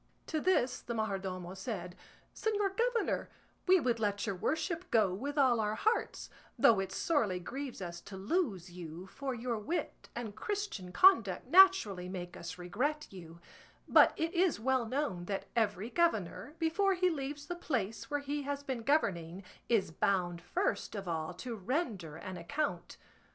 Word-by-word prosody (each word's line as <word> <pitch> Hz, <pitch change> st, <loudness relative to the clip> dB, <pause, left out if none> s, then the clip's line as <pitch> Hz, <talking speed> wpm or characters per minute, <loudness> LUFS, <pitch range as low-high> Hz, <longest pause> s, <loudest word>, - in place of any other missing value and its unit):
To 315 Hz, -, -1 dB
this 260 Hz, -9 st, +2 dB
the 235 Hz, -, -4 dB
majordomo 190 Hz, -4 st, -3 dB
said, 190 Hz, -3 st, -5 dB, 0.4 s
"Señor 410 Hz, -3 st, 0 dB
governor, 470 Hz, 0 st, 0 dB, 0.4 s
we 370 Hz, 0 st, +7 dB
would 240 Hz, -6 st, 0 dB
let 205 Hz, -2 st, 0 dB
your 200 Hz, -, -1 dB
worship 325 Hz, -, -2 dB
go 215 Hz, -, +3 dB
with 280 Hz, +9 st, -4 dB
all 255 Hz, -5 st, +4 dB
our 215 Hz, 0 st, 0 dB
hearts, 440 Hz, -, 0 dB, 0.3 s
though 220 Hz, -4 st, +6 dB
it 195 Hz, -, -2 dB
sorely 225 Hz, -, +1 dB
grieves 260 Hz, +3 st, -5 dB
us 175 Hz, -1 st, -6 dB
to 195 Hz, -, -9 dB
lose 195 Hz, -, -1 dB
you, 175 Hz, 0 st, -8 dB
for 265 Hz, +6 st, -4 dB
your 235 Hz, -1 st, -2 dB
wit 320 Hz, +12 st, -4 dB
and 225 Hz, -4 st, -5 dB
Christian 385 Hz, -, -3 dB
conduct 245 Hz, -, +5 dB
naturally 315 Hz, -, +6 dB
make 180 Hz, -1 st, -6 dB
us 170 Hz, +1 st, -7 dB
regret 255 Hz, +13 st, -2 dB
you; 170 Hz, -3 st, -11 dB, 0.5 s
but -, -, +7 dB
it 325 Hz, +1 st, -1 dB
is 355 Hz, -, +2 dB
well 255 Hz, 0 st, +1 dB
known 220 Hz, -9 st, -2 dB
that 195 Hz, +1 st, -3 dB
every 215 Hz, 0 st, 0 dB
governor, 250 Hz, -, 0 dB
before 370 Hz, +4 st, +2 dB
he 365 Hz, 0 st, +2 dB
leaves 290 Hz, -1 st, -4 dB
the 350 Hz, -, -3 dB
place 225 Hz, -, -2 dB
where 290 Hz, -1 st, -1 dB
he 290 Hz, +1 st, -2 dB
has 285 Hz, 0 st, -3 dB
been 265 Hz, -4 st, -3 dB
governing, 195 Hz, -, 0 dB, 0.3 s
is 220 Hz, -8 st, +2 dB
bound 175 Hz, 0 st, 0 dB
first 355 Hz, -, -1 dB
of 195 Hz, -2 st, -5 dB
all 160 Hz, 0 st, -2 dB
to 240 Hz, +5 st, -5 dB
render 205 Hz, -, -2 dB
an 185 Hz, +2 st, -7 dB
account. 285 Hz, -, -3 dB
230 Hz, 160 wpm, -33 LUFS, 185-300 Hz, 0.5 s, we